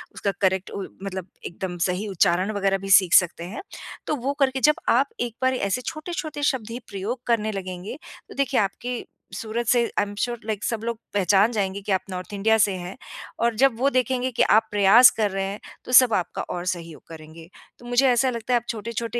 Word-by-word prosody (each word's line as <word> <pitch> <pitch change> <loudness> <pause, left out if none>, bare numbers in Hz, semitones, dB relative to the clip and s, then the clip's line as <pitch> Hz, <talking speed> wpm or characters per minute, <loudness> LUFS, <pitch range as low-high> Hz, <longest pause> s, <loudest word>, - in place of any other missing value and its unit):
उसका 200 - -1
करेक्ट 190 0 +1
उ 200 - -5 0.2
मतलब 190 -2 -5 0.2
एकदम 180 0 -5
सही 180 +4 -2
उच्चारण 185 +1 +1
वगैरह 195 -2 0
भी 195 0 -8
सीख 190 -2 +6
सकते 170 -2 +4
हैं। 185 +6 -7 0.5
तो - - 0
वो 275 +1 -2
करके 265 -1 +2
जब 300 - +3
आप 270 +4 +3
एक 240 -2 -3
बार 260 0 +2
ऐसे 200 0 -1
छोटे-छोटे 310 -2 -5
शब्द 260 -6 0
ही 240 - -5
प्रयोग 210 +5 -4
करने 220 -2 +1
लगेंगे, 185 +3 -6 0.3
तो - - -11
देखिए 275 -2 +1
आपकी 240 +5 -4 0.3
सूरत 230 +2 -3
से 240 +1 +4 0.2
आई - - +3
एम 205 0 -6
श्योर 240 -1 -2
लाइक 215 -2 -3
सब 230 -2 -2
लोग 235 0 -3 0.2
पहचान 200 +2 +3
जाएँगे 200 -3 -2
कि - - -2
आप 190 - +2
नॉर्थ 185 +1 -6
इंडिया 220 +3 +2
से 205 -2 +3
हैं 180 +1 -7 0.4
और 235 -1 +1
जब 260 0 +3
वो 275 +2 +3
देखेंगे 255 0 0
कि - - +5
आप 220 +1 +4
प्रयास 210 +5 +7
कर 215 -2 +1
रहे 195 0 -2
हैं 200 +2 -5 0.3
तो - - -7
सब 250 -2 +7
आपका 180 - -1
और 175 0 -5
सहयोग 170 -3 -5
करेंगे। 160 0 -12 0.3
तो 240 - -15
मुझे 245 +3 +3
ऐसा 245 +1 +3
लगता 235 0 -3
है - - +5
आप 235 - -23
छोटे-छोटे 230 +1 -3
215 Hz, 215 wpm, -24 LUFS, 190-245 Hz, 0.5 s, प्रयास